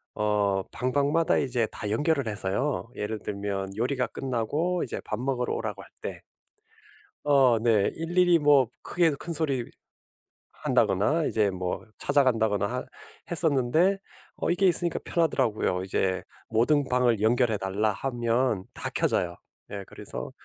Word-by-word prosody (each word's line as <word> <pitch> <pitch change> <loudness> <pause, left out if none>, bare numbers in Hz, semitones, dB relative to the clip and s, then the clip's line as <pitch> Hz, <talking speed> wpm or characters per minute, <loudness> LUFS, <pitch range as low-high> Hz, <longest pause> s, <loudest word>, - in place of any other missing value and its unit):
어 100 -2 +1
방방마다 145 +6 +1
이제 120 -5 0
다 105 - -4
연결을 140 +3 +1
해서요. 105 +6 -2
예를 105 +1 -3
들면 100 -1 -4
요리가 125 +3 0
끝나고 145 +8 -1
이제 - - -5
밥 105 - -3
먹으러 125 -1 -1
오라고 - - -4
할 - - -17
때 - - -6 1.0
어. 135 -5 +5
네. 110 -4 +3
일일이 175 +1 +3
뭐 145 -5 +5
크게 170 -2 +2
큰 170 +4 -5
소리 140 -6 +1 0.8
한다거나 150 - +1
이제 105 -6 +1
뭐 90 +2 -4
찾아 140 0 +3
간다거나 110 -1 0 0.4
했었는데 165 +4 +3 0.4
어 - - -1
이게 180 +3 +2
있으니까 175 -1 +2
편하더라고요. 115 - 0
이제 95 -1 -1 0.3
"모든 130 +5 +2
방을 125 -4 +2
연결해 115 -1 +3
달라." 100 +3 0
하면 120 -2 0
다 - - -4
켜져요. 85 -1 0 0.4
예. 100 -1 -5
그래서 - - -7
120 Hz, 285 characters per minute, -27 LUFS, 105-145 Hz, 1.0 s, 어